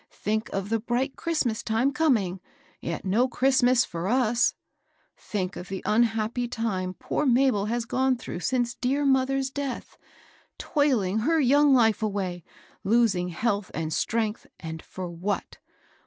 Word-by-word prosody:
Think 215 Hz, +2 st, -2 dB
of 195 Hz, 0 st, -3 dB
the 225 Hz, 0 st, +1 dB
bright 245 Hz, +4 st, -1 dB
Christmas 290 Hz, -10 st, -1 dB
time 230 Hz, +5 st, +1 dB
coming, 225 Hz, -, +1 dB, 0.4 s
yet 170 Hz, +2 st, -5 dB
no 220 Hz, +7 st, +2 dB
Christ*' 265 Hz, +2 st, +2 dB
mas 245 Hz, 0 st, +4 dB
for 170 Hz, 0 st, -4 dB
us. 240 Hz, 0 st, +2 dB, 0.6 s
Think 190 Hz, -3 st, -4 dB
qS, 180 Hz, -, -8 dB
the 190 Hz, 0 st, -5 dB
unhappy 225 Hz, +2 st, +1 dB
time 200 Hz, -6 st, -2 dB
poor 300 Hz, -, -2 dB
Mabel 245 Hz, -5 st, +3 dB
has 235 Hz, +1 st, -1 dB
gone 260 Hz, +1 st, +1 dB
through 200 Hz, -, -6 dB
since 240 Hz, +3 st, 0 dB
dear 275 Hz, +4 st, 0 dB
moth^'a 270 Hz, 0 st, +1 dB
death, 280 Hz, -3 st, -5 dB, 0.6 s
toiling 240 Hz, -, +1 dB
her 320 Hz, +8 st, +2 dB
young 285 Hz, +1 st, +4 dB
life 225 Hz, -3 st, +3 dB
away, 195 Hz, -5 st, -2 dB, 0.4 s
losing 195 Hz, -5 st, +2 dB
health 200 Hz, +2 st, -1 dB
and 160 Hz, -1 st, -2 dB
strength; 220 Hz, +2 st, -1 dB
and 160 Hz, -1 st, -6 dB
for 185 Hz, -1 st, -7 dB
what? 175 Hz, +4 st, -4 dB
230 Hz, 145 wpm, -26 LUFS, 195-260 Hz, 0.6 s, mas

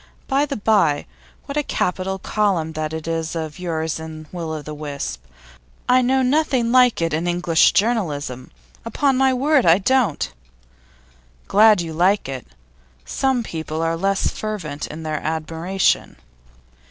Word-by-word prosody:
By 280 Hz, +2 st, +1 dB
the 275 Hz, -, -3 dB
bye, 200 Hz, -9 st, +2 dB, 0.4 s
what 280 Hz, +1 st, -5 dB
a -, -, +3 dB
capital 190 Hz, -7 st, -2 dB
column 190 Hz, -5 st, 0 dB
that 155 Hz, -1 st, -3 dB
is 165 Hz, 0 st, -2 dB
of 160 Hz, -1 st, -5 dB
yours 160 Hz, -3 st, -2 dB
in 160 Hz, -1 st, -8 dB
Will 170 Hz, -3 st, -5 dB
o' 155 Hz, -1 st, -5 dB
the 150 Hz, -, -7 dB
Wisp. 140 Hz, -, -5 dB, 0.6 s
I 255 Hz, +1 st, +5 dB
know 260 Hz, +1 st, +2 dB
nothing 255 Hz, -3 st, +1 dB
like 250 Hz, -7 st, +4 dB
it 165 Hz, -2 st, -1 dB
in 165 Hz, +3 st, -1 dB
English 175 Hz, -2 st, +3 dB
journalism; 155 Hz, -, -1 dB, 0.3 s
upon 275 Hz, -2 st, +1 dB
my 265 Hz, 0 st, +3 dB
word 275 Hz, +2 st, +3 dB
I 165 Hz, +1 st, +6 dB
don't!' 205 Hz, -, +1 dB, 1.1 s
'Glad 210 Hz, -2 st, +5 dB
you 165 Hz, -2 st, -5 dB
like 185 Hz, +4 st, +2 dB
it. 135 Hz, -2 st, -6 dB, 0.6 s
Some 265 Hz, -3 st, 0 dB
people 160 Hz, -4 st, -4 dB
are 165 Hz, 0 st, 0 dB
less 195 Hz, +3 st, 0 dB
fervent 180 Hz, -9 st, -5 dB
in 160 Hz, +1 st, -8 dB
their 155 Hz, -1 st, -3 dB
admiration. 160 Hz, +4 st, -1 dB
175 Hz, 145 wpm, -21 LUFS, 160-230 Hz, 1.1 s, I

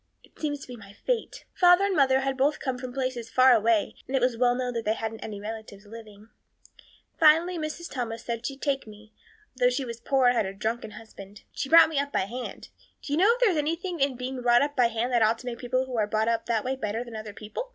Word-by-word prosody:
It -, -, -23 dB
seems 290 Hz, -2 st, -3 dB
to -, -, -10 dB
be 250 Hz, -, -8 dB
my 200 Hz, -3 st, -14 dB
fate. 480 Hz, -, -3 dB
Father 355 Hz, +1 st, +5 dB
and 395 Hz, -2 st, 0 dB
mother 265 Hz, -3 st, +3 dB
had 270 Hz, 0 st, -1 dB
both 275 Hz, +3 st, +1 dB
come 260 Hz, -3 st, -3 dB
from 255 Hz, 0 st, -6 dB
places 255 Hz, -3 st, -3 dB
far 255 Hz, 0 st, +5 dB
away 225 Hz, -1 st, +2 dB
and 270 Hz, -, -3 dB
it -, -, +3 dB
was 250 Hz, -1 st, +1 dB
well 245 Hz, +1 st, +2 dB
known 250 Hz, -1 st, -2 dB
they 225 Hz, -2 st, -1 dB
hadn't 225 Hz, 0 st, -5 dB
any 210 Hz, -2 st, -6 dB
relatives 215 Hz, -1 st, -8 dB
living. 215 Hz, -1 st, -13 dB, 0.9 s
Finally 330 Hz, +2 st, +4 dB
Mrs. 310 Hz, +2 st, -5 dB
Thomas 235 Hz, -6 st, -5 dB
said 235 Hz, -1 st, -4 dB
she'd 275 Hz, +2 st, -6 dB
take 275 Hz, -4 st, -1 dB
me, 215 Hz, +1 st, -14 dB, 0.4 s
though 250 Hz, -1 st, +4 dB
she 255 Hz, +2 st, -2 dB
was 235 Hz, -1 st, -7 dB
poor 265 Hz, +2 st, +1 dB
and 245 Hz, 0 st, +4 dB
had 215 Hz, -4 st, +1 dB
a 195 Hz, -, -7 dB
drunken 220 Hz, +2 st, -3 dB
husband. 205 Hz, -2 st, -13 dB
She 270 Hz, -, -4 dB
brought 330 Hz, +1 st, +8 dB
me 305 Hz, -3 st, -1 dB
up 285 Hz, 0 st, -2 dB
by -, -, +1 dB
hand. 240 Hz, +6 st, -6 dB, 0.3 s
Do 285 Hz, -, -4 dB
you -, -, +1 dB
know 395 Hz, +6 st, +5 dB
if -, -, -10 dB
there 470 Hz, -5 st, +5 dB
is 335 Hz, -, -1 dB
anything 335 Hz, +4 st, -2 dB
in 275 Hz, -1 st, +1 dB
being 255 Hz, +1 st, -5 dB
brought 240 Hz, +1 st, +4 dB
up 290 Hz, 0 st, -3 dB
by 245 Hz, -2 st, +4 dB
hand 230 Hz, +2 st, -2 dB
that 240 Hz, -2 st, +2 dB
ought 220 Hz, +1 st, +3 dB
to 250 Hz, -, -13 dB
make 240 Hz, -1 st, -5 dB
people 255 Hz, +1 st, -1 dB
who 255 Hz, -1 st, -6 dB
are 210 Hz, -, +1 dB
brought 215 Hz, +1 st, 0 dB
up 230 Hz, -1 st, -1 dB
that 230 Hz, -2 st, 0 dB
way 260 Hz, +1 st, -1 dB
better 225 Hz, -2 st, -3 dB
than 235 Hz, -2 st, -10 dB
other 215 Hz, -1 st, -6 dB
people? 220 Hz, -, -7 dB
245 Hz, 255 wpm, -26 LUFS, 225-275 Hz, 0.9 s, brought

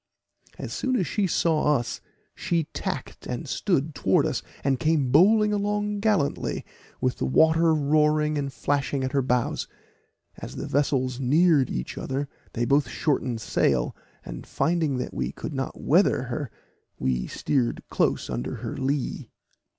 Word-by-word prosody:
As -, -, -6 dB
soon 255 Hz, -1 st, 0 dB
as 190 Hz, -, +1 dB
she 205 Hz, +1 st, 0 dB
saw 155 Hz, -3 st, +2 dB
us, 120 Hz, -, -5 dB, 0.3 s
she 170 Hz, -2 st, 0 dB
tacked -, -, -5 dB
and -, -, -4 dB
stood 145 Hz, +3 st, 0 dB
towards 95 Hz, -7 st, +2 dB
us, -, -, -3 dB, 0.2 s
and 135 Hz, -2 st, +1 dB
came 155 Hz, -4 st, +1 dB
bowling 210 Hz, -, +5 dB
along 205 Hz, 0 st, -1 dB
gallantly, 200 Hz, -9 st, 0 dB, 0.3 s
with 130 Hz, -1 st, 0 dB
the -, -, 0 dB
water 160 Hz, -, +4 dB
roaring 150 Hz, 0 st, +2 dB
and 140 Hz, -2 st, -2 dB
flashing 140 Hz, +1 st, -1 dB
at 130 Hz, -, -1 dB
her 140 Hz, -, +2 dB
bows. 125 Hz, -2 st, 0 dB, 0.7 s
As -, -, -8 dB
the -, -, -4 dB
vessels 130 Hz, -3 st, 0 dB
neared 145 Hz, +1 st, +4 dB
each 60 Hz, -, -4 dB
other 135 Hz, +2 st, -2 dB, 0.3 s
they 120 Hz, 0 st, 0 dB
both 140 Hz, +3 st, +2 dB
shortened 130 Hz, -6 st, -1 dB
sail, -, -, +1 dB, 0.3 s
and -, -, -8 dB
finding 160 Hz, -5 st, 0 dB
that 125 Hz, -, -4 dB
we 65 Hz, 0 st, -2 dB
could 150 Hz, -, -6 dB
not 135 Hz, -1 st, -4 dB
weather 170 Hz, -5 st, +3 dB
her, 130 Hz, +1 st, -4 dB, 0.5 s
we 65 Hz, -1 st, -1 dB
steered 125 Hz, -5 st, -1 dB
close -, -, +1 dB
under -, -, -3 dB
her -, -, -5 dB
lee. 135 Hz, 0 st, -2 dB
145 Hz, 150 wpm, -26 LUFS, 130-160 Hz, 0.7 s, bowling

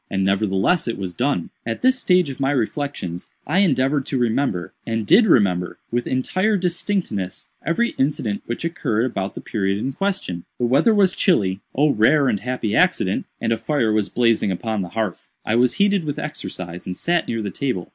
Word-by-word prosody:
And 95 Hz, 0 st, 0 dB
nevertheless 100 Hz, -, +1 dB
it 115 Hz, -, -2 dB
was 95 Hz, -3 st, -5 dB
done. 125 Hz, -6 st, -1 dB
"At 115 Hz, -1 st, -4 dB
this 260 Hz, 0 st, +4 dB
stage 180 Hz, -, +3 dB
of 135 Hz, -, -10 dB
my 135 Hz, 0 st, +1 dB
reflections 130 Hz, -, -2 dB, 0.2 s
I 165 Hz, +6 st, +1 dB
endeavored 140 Hz, -6 st, +2 dB
to 135 Hz, -, -1 dB
remember, 120 Hz, -6 st, 0 dB
and 115 Hz, -2 st, -2 dB
did 215 Hz, -, +6 dB
remember, 90 Hz, -, +2 dB
with 120 Hz, +1 st, -1 dB
entire 185 Hz, +11 st, +1 dB
distinctness, 175 Hz, -, -2 dB
every 235 Hz, +9 st, +1 dB
incident 130 Hz, -7 st, 0 dB
which 120 Hz, +7 st, -3 dB
occurred 120 Hz, -9 st, 0 dB
about 100 Hz, -6 st, -3 dB
the -, -, -6 dB
period 100 Hz, -3 st, -1 dB
in 135 Hz, +6 st, -3 dB
question. 185 Hz, -, -3 dB
The 120 Hz, -, 0 dB
weather 140 Hz, -, +4 dB
was 195 Hz, -3 st, +4 dB
chilly 100 Hz, -, +2 dB, 0.2 s
(oh 145 Hz, +2 st, +4 dB
rare 140 Hz, +6 st, +4 dB
and 105 Hz, -, 0 dB
happy 115 Hz, -2 st, -2 dB
accident!), -, -, +2 dB
and -, -, -1 dB
a -, -, -1 dB
fire 125 Hz, -7 st, 0 dB
was 105 Hz, -2 st, +1 dB
blazing 115 Hz, -4 st, +2 dB
upon 110 Hz, +3 st, -2 dB
the 90 Hz, -, -5 dB
hearth. 110 Hz, -2 st, -3 dB, 0.2 s
I 110 Hz, -, 0 dB
was 120 Hz, +1 st, +3 dB
heated 200 Hz, -2 st, +2 dB
with 145 Hz, -2 st, -3 dB
exercise 90 Hz, -, -6 dB
and 90 Hz, -1 st, -4 dB
sat 170 Hz, 0 st, 0 dB
near 115 Hz, -2 st, -2 dB
the 100 Hz, -, -3 dB
table. 125 Hz, -10 st, -2 dB
120 Hz, 190 wpm, -21 LUFS, 100-155 Hz, 0.2 s, did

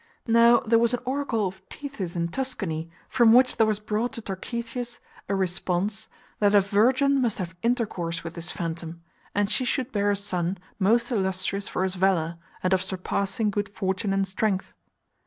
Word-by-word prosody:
Now 235 Hz, 0 st, +6 dB
there 230 Hz, 0 st, +3 dB
was 235 Hz, +1 st, +3 dB
an -, -, -6 dB
oracle 260 Hz, -5 st, 0 dB
of 190 Hz, 0 st, -5 dB
Tethys 275 Hz, -, -6 dB
in 170 Hz, 0 st, -1 dB
Tuscany, 180 Hz, -10 st, -2 dB, 0.2 s
from 235 Hz, -2 st, +5 dB
which 255 Hz, +1 st, +5 dB
there 225 Hz, -1 st, +4 dB
was 215 Hz, -1 st, +1 dB
brought 215 Hz, +3 st, -2 dB
to 230 Hz, -, -5 dB
Tarchetius 235 Hz, +5 st, -4 dB, 0.3 s
a 200 Hz, -, +1 dB
response 190 Hz, +2 st, -1 dB, 0.3 s
that 205 Hz, -1 st, +4 dB
a -, -, +9 dB
virgin 255 Hz, +8 st, +3 dB
must 235 Hz, -4 st, 0 dB
have 180 Hz, -3 st, -5 dB
inter 235 Hz, 0 st, +2 dB
course 170 Hz, -4 st, -4 dB
with 165 Hz, 0 st, -6 dB
this 170 Hz, 0 st, -4 dB
phantom, 165 Hz, -1 st, -5 dB, 0.3 s
and 205 Hz, 0 st, +2 dB
she 255 Hz, -, +2 dB
should 255 Hz, +1 st, -1 dB
bear 205 Hz, -1 st, +1 dB
a 205 Hz, -, +3 dB
son 190 Hz, -2 st, -1 dB, 0.2 s
most 235 Hz, +5 st, +3 dB
illustrious 190 Hz, -1 st, 0 dB
for 185 Hz, -, -1 dB
his 190 Hz, -1 st, 0 dB
valour, 175 Hz, -3 st, +1 dB, 0.2 s
and 185 Hz, +1 st, +2 dB
of 185 Hz, -, +3 dB
surpassing 200 Hz, +3 st, -1 dB
good 205 Hz, 0 st, -2 dB
fortune 195 Hz, +1 st, -2 dB
and 195 Hz, 0 st, +1 dB
strength. 190 Hz, 0 st, -1 dB
200 Hz, 180 wpm, -26 LUFS, 185-235 Hz, 0.3 s, a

